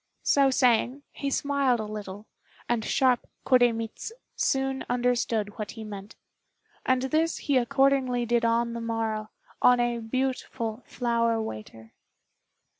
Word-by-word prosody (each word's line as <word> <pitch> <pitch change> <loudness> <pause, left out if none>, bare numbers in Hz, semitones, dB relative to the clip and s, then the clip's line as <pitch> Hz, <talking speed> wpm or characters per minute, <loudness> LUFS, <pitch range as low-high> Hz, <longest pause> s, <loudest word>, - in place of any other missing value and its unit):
So 275 -1 +4
saying, 255 +1 +2
he 280 - -3
smiled 275 -3 +1
a - - -2
little, 210 -1 -7 0.4
and 235 -2 0
sharp 255 +1 +2 0.2
Koremitz 240 - +2 0.2
soon 270 0 0
understood 240 -3 0
what 210 -2 -4
he 225 - -8
meant. 205 -1 -9 0.7
And 260 0 +1
this 315 +5 +1
he 285 - -1
accordingly 255 -1 +2
did 235 0 +1
on 235 0 +1
the 235 - -4
morrow, 225 -2 -2 0.3
on 250 0 +6
a 240 -1 0
beautiful 235 -1 -3
flower 230 -2 0
waiter. 110 - -7
240 Hz, 125 wpm, -27 LUFS, 225-260 Hz, 0.7 s, on